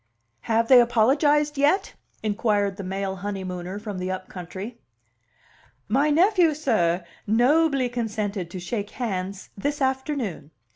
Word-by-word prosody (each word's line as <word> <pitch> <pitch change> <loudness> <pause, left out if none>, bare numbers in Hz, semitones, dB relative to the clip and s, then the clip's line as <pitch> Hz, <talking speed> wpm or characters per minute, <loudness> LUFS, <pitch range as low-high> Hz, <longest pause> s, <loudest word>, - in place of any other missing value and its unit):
"Have 230 +1 +3
they 255 -1 +8
apologized 285 +5 +3
yet?" 295 +8 +2 0.3
inquired 205 -2 0
the 200 - -5
male 190 +1 -3
honeymooner 185 -1 -5
from 210 -3 -6
the 180 +1 -3
up 185 0 -5
country. 190 +6 -7 1.1
"My 275 +7 +2
nephew, 345 0 +4
sir, 180 - +1 0.2
nobly 270 +4 +3
consented 210 -6 -3
to 185 - -6
shake 205 +3 -4
hands 195 -5 -4
this 285 +9 -2
afternoon. 265 - -2
220 Hz, 125 wpm, -24 LUFS, 190-275 Hz, 1.1 s, they